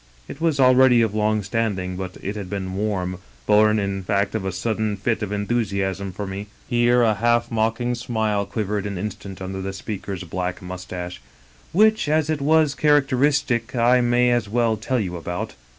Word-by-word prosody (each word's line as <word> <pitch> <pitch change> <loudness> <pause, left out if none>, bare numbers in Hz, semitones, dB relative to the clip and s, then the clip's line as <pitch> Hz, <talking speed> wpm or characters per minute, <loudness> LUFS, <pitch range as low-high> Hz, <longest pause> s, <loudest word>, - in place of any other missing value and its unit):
It - - -9
was 160 -4 +1
already 130 -2 +6
of 110 -2 -1
long 110 0 +1
standing, 100 -3 -2
but 95 0 -6
it 100 +2 -3
had 100 -3 -6
been 95 -2 -4
warm^ 95 -3 -2 0.3
bom 105 +3 +4
in 100 -1 -2
fact 100 +1 0
of 110 -4 -2
a 95 - -1
sudden 110 +1 -2
fit 115 +4 -1
of 105 -1 -3
enthusiasm 100 -3 -1
for 100 +3 -5
me" 100 +2 -6
— - - -29
^here 120 0 +4
a 110 - +3
half 120 +2 +1
mocking 115 +2 0
smile 110 -4 -1
quivered 105 -2 -2
an 100 -2 -4
instant 95 -1 -6
under 95 0 -5
the 95 0 -4
speaker's 95 -1 -5
black 90 +1 -3
mustache 90 -2 -7 0.2
— 65 -1 -29
" - - -29
which, 215 -3 +3
as 155 0 +2
it 150 -2 -2
was 155 0 +3
characteristic, 135 -5 +2
I 125 +1 +4
may 120 0 +3
as 120 -4 0
well 115 0 +2
tell 125 +4 -1
you 90 -4 -3
about. 90 +1 -4
105 Hz, 190 wpm, -22 LUFS, 95-120 Hz, 0.3 s, already